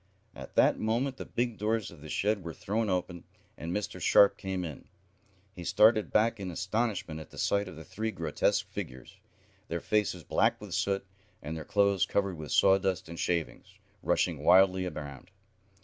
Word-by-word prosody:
At - - -10
that - - +4
moment 125 +5 0
the - - -6
big 120 -2 -2
doors 110 0 -1
of 85 -4 -14
the 75 - -10
shed 105 +3 0
were 85 -1 -6
thrown 110 +1 -1
open, 90 -2 -2 0.3
and 80 +4 -6
Mr. 105 +2 -3
Sharp 100 0 +6
came 95 -2 -4
in. 80 -4 -8 0.7
He 90 - -8
started 110 +4 +4
back 110 0 +2
in 95 -2 -4
astonishment 95 -2 -2
at 80 - -10
the - - -14
sight 100 0 +1
of 90 - -9
the 80 - -9
three 110 +7 -4
grotesque 110 - 0
figures, 65 0 -8 0.5
their 85 - -2
faces 100 -3 0
black - - +1
with - - -9
the - - -7
soot, 100 0 0 0.4
and 75 +3 -4
their 80 -2 -6
clothes 100 0 +2
covered 100 -2 0
with 75 - -7
sawdust 95 -3 +3
and 85 - -8
shavings, 85 -3 -2 0.3
rushing - - 0
wildly 95 0 +5
around. 75 -1 -8
95 Hz, 180 wpm, -30 LUFS, 85-105 Hz, 0.7 s, Sharp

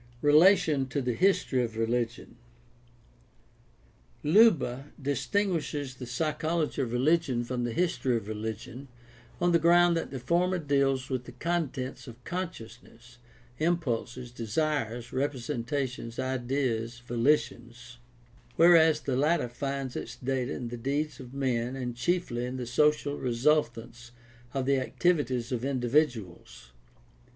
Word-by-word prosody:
Relation 150 -2 +5
to 130 - -2
the 125 -2 -1
history 155 -5 +2
of 115 -2 -5
religion. 115 +1 -2 0.9
— - - -33
Leuba 150 - +3
distinguishes 145 -1 -1
the 125 - -7
psychology 155 +3 -1
of 125 -4 -2
religion 130 0 +1
from 120 0 -3
the 120 - -2
history 130 -5 0
of 110 - -7
religion 110 +5 -6 0.5
on 175 0 +2
the 170 - +4
ground 175 +1 +5
that 165 - -2
the 135 - -6
former 175 +8 +1
deals 140 -4 0
with 125 -1 -2
the 125 - -9
contents 135 -2 -3
of 120 +1 -12
conscious 165 -11 -5
ness, 120 +1 -19 0.4
impulses, 125 -7 -1
desires, 120 0 -2
representations, 130 -2 -3
ideas, 125 -2 -2
volitions; 120 -1 -1 0.6
whereas 160 -2 +6
the 135 -3 -2
latter 150 +1 +2
finds 135 +1 -4
its - - -5
data 130 0 -2
in 120 -2 -4
the 120 - -6
deeds 145 +6 -2
of 125 -2 -10
men 130 -2 -1
and 125 -2 -4
chiefly 125 -3 -1
in 130 +1 -5
the 125 - -4
social 145 +3 +1
resultants 120 -2 -1 0.4
of 135 -1 -2
the 135 0 +2
activities 130 -2 0
of 125 -2 -2
individuals. 125 - -1
130 Hz, 125 wpm, -28 LUFS, 120-150 Hz, 0.9 s, whereas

